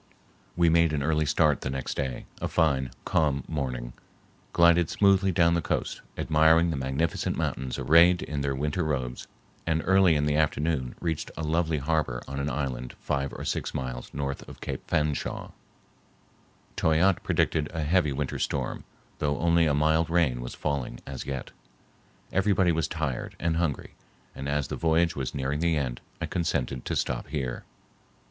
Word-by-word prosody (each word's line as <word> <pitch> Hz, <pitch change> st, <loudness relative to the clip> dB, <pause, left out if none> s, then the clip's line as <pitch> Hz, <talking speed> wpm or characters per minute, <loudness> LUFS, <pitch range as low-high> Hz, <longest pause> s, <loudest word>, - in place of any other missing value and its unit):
We 85 Hz, -1 st, +3 dB
made 85 Hz, -1 st, +4 dB
an 70 Hz, -2 st, 0 dB
early 75 Hz, 0 st, +1 dB
start 75 Hz, -1 st, +3 dB
the -, -, -3 dB
next 65 Hz, -1 st, -3 dB
day, 65 Hz, -4 st, -3 dB, 0.2 s
a -, -, 0 dB
fine, 65 Hz, -5 st, +1 dB, 0.2 s
calm 70 Hz, -4 st, +1 dB
morning, 60 Hz, -5 st, -3 dB, 0.6 s
glided 85 Hz, -1 st, +5 dB
smoothly 100 Hz, -1 st, +3 dB
down 85 Hz, -1 st, +4 dB
the 85 Hz, -, +1 dB
coast, -, -, -2 dB, 0.2 s
admiring 80 Hz, +2 st, +4 dB
the -, -, -2 dB
magnificent 65 Hz, +5 st, -1 dB
mountains 65 Hz, -2 st, -2 dB
arrayed 85 Hz, +3 st, +5 dB
in 75 Hz, -2 st, -3 dB
their 70 Hz, -1 st, -1 dB
winter 75 Hz, +6 st, -1 dB
robes, 65 Hz, -5 st, -3 dB, 0.4 s
and 80 Hz, -1 st, +1 dB
early 95 Hz, -2 st, +5 dB
in 75 Hz, 0 st, +1 dB
the 75 Hz, 0 st, +1 dB
afternoon 75 Hz, -3 st, 0 dB
reached 80 Hz, -3 st, -2 dB
a 80 Hz, -, -3 dB
lovely 80 Hz, 0 st, +1 dB
harbor 70 Hz, -3 st, -1 dB
on 70 Hz, 0 st, -4 dB
an 70 Hz, +1 st, -1 dB
island 65 Hz, -3 st, -3 dB
five 70 Hz, 0 st, -2 dB
or -, -, -7 dB
six -, -, -2 dB
miles 60 Hz, -1 st, -4 dB
north 70 Hz, -1 st, -3 dB
of -, -, -11 dB
Cape -, -, -4 dB
Fanshawe. 75 Hz, -1 st, -1 dB, 1.2 s
Toyatte 85 Hz, +4 st, +3 dB
predicted 75 Hz, -2 st, +1 dB
a 80 Hz, -1 st, -2 dB
heavy 80 Hz, 0 st, +2 dB
winter 70 Hz, 0 st, -3 dB
storm, -, -, -2 dB, 0.3 s
though 75 Hz, -1 st, 0 dB
only 85 Hz, 0 st, +3 dB
a 75 Hz, -, +2 dB
mild 80 Hz, +2 st, +2 dB
rain 80 Hz, -8 st, +2 dB
was -, -, -6 dB
falling 65 Hz, -4 st, -3 dB
as 70 Hz, -1 st, -6 dB
yet. 70 Hz, -2 st, -4 dB, 0.8 s
Everybody 95 Hz, -2 st, +3 dB
was 80 Hz, -2 st, 0 dB
tired 80 Hz, -7 st, -3 dB
and 80 Hz, -1 st, 0 dB
hungry, 85 Hz, -5 st, -2 dB, 0.4 s
and 70 Hz, +1 st, -5 dB
as 75 Hz, -1 st, 0 dB
the -, -, -2 dB
voyage 85 Hz, 0 st, +2 dB
was 65 Hz, -2 st, -3 dB
nearing 70 Hz, +2 st, -1 dB
the 85 Hz, -1 st, +2 dB
end, 65 Hz, -4 st, -2 dB, 0.2 s
I -, -, -2 dB
consented 70 Hz, -7 st, -2 dB
to -, -, -2 dB
stop -, -, -1 dB
here. 65 Hz, -5 st, -4 dB
75 Hz, 165 wpm, -27 LUFS, 70-85 Hz, 1.2 s, glided